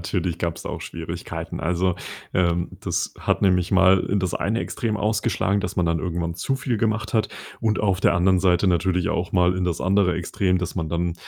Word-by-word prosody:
Natürlich 85 0 -2
gab's 85 -1 -3
auch - - -4
Schwierigkeiten. - - -6
Also, 90 +1 +1 0.4
ähm, 85 -1 +1
das - - -2
hat - - 0
nämlich 90 -2 +2
mal 95 0 +5
in 100 +1 0
das 95 -2 -1
eine 110 +4 -1
Extrem 110 -3 -2
ausgeschlagen, 105 -2 0
dass 90 0 -4
man 90 - +2
dann 85 0 +1
irgendwann 85 -1 -2
zu 115 +10 -1
viel 125 -2 -1
gemacht 110 +1 -1
hat. 110 - +2 0.3
Und 110 -1 +1
auf 95 -3 +1
der - - +4
anderen 95 +1 +3
Seite 90 +1 +3
natürlich 90 0 +1
auch 90 - -2
mal 90 0 +3
in 90 - -1
das 90 -2 -1
andere 95 -1 +2
Extrem, 90 +2 0
dass 90 -1 -4
man 80 -4 -2
dann, 85 0 -1
90 Hz, 200 wpm, -23 LUFS, 85-100 Hz, 0.4 s, mal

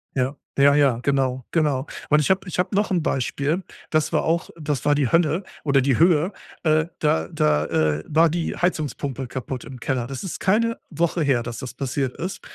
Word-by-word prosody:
Ja. 130 +2 0 0.2
Ja, 140 +1 +6
ja, 140 -5 +3
genau, 130 -2 0
genau. 150 -5 +1 0.2
Und 150 - +5
ich 150 - 0
habe 190 +1 +2
ich 180 - -5
habe 185 +2 0
noch 205 0 +1
'n 180 -3 +2
Beispiel, 145 +4 -1 0.3
das 155 -1 +1
war - - +1
auch 170 +1 0
das 150 -4 -2
war 145 - +4
die 145 -4 +1
Hölle 165 - +2 0.2
oder 140 -2 +3
die 135 -1 +2
Höhe. 170 +2 +4 0.3
Äh, 155 -1 +3
da 85 - +1
da, 75 0 +2
äh, 75 -1 +1
war 160 +2 +4
die 165 +1 -2
Heizungspumpe 145 -6 -2
kaputt 130 0 -5
im 130 -3 -10
Keller. 125 0 -1
Das 135 +1 -6
ist 190 - -5
keine 230 +4 +2
Woche 170 0 0
her, 135 -5 +2
dass 120 -1 -6
das 130 -2 -6
passiert 135 -1 -2
ist. 185 +3 -4
145 Hz, 200 wpm, -23 LUFS, 130-165 Hz, 0.3 s, Ja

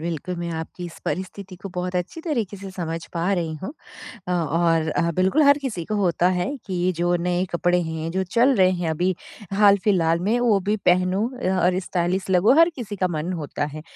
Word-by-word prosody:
बिल्कुल, 170 +2 -4
मैं 170 0 -4
आपकी 160 +2 -6
इस 170 - -9
परिस्थिति 190 +3 -5
को 195 +2 -8
बहुत 180 +1 -3
अच्छी 180 - -3
तरीके 235 - -2
से 195 0 -8
समझ 165 -3 -4
पा 175 +3 0
रही 170 -4 -1
हूँ। 195 - -5 0.6
अ, - - -1
और 165 -1 +1
अ, 170 +1 0
बिल्कुल 190 +12 +3
हर 285 0 +6
किसी 215 -11 -3
को 215 - -2
होता 180 -3 +2
है 180 0 0 0.2
कि 185 -1 0
जो 175 +1 +2
नए 175 +1 0
कपड़े 175 +1 +2
हैं 160 0 -4
जो 190 +1 0
चल 240 +9 +3
रहे 185 -2 +5
हैं 175 -3 -2
अभी 180 +3 0 0.4
हाल-फिलहाल 195 -5 +4
में, 215 +7 +1
वो 225 -5 +3
भी 205 +3 0
पहनूँ 185 +3 +3 0.2
अ, 185 - -1
और 180 +1 +3
स्टाइलिश 185 +1 -2
लगूँ, 190 +6 +5
हर 330 - +7
किसी 215 -5 -6
का 185 -1 +1
मन 170 +1 -3
होता 150 -3 -3
है। 155 - -7
180 Hz, 205 wpm, -23 LUFS, 170-195 Hz, 0.6 s, हर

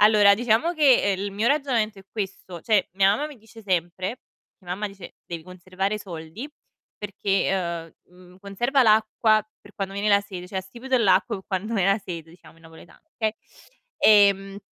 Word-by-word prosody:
Allora 210 -1 +6
diciamo 240 - +1
che 265 - +4
il 200 0 -4
mio 215 +4 -1
ragionamento 245 -8 0
è - - -13
questo, 190 -4 -6
cioè 210 -5 +2
mia 195 +1 +4
mamma 295 - -2
mi 295 -4 -12
dice 225 +1 -16
sempre 185 +3 -2 0.4
mia 180 -3 -12
mamma 210 +3 -3
dice: 195 -3 -12
"Devi 170 -2 -6
conservare 185 +3 -4
soldi 175 - -8 0.5
perché, 190 -4 -2
uhm, 180 - -23
mhmm, 180 0 -17
conserva 240 +8 +1
l'acqua 215 -1 +3
per 205 - -18
quando 195 -1 -4
viene 200 +1 -1
la 200 -1 +5
sete" 190 -3 -9
cioè 190 - -3
"Astipite 240 +8 -2
l'acqu 190 -4 +3
pe 190 - -11
quand 200 +4 -3
ven 195 -4 +2
a 195 - +4
sete" 170 -5 -8
diciamo 170 -1 -18
in 165 - -22
napoletano, 165 +1 -16
okay. 220 -1 -1 0.6
Ehm 200 -2 +4
200 Hz, 175 wpm, -24 LUFS, 185-220 Hz, 0.6 s, Allora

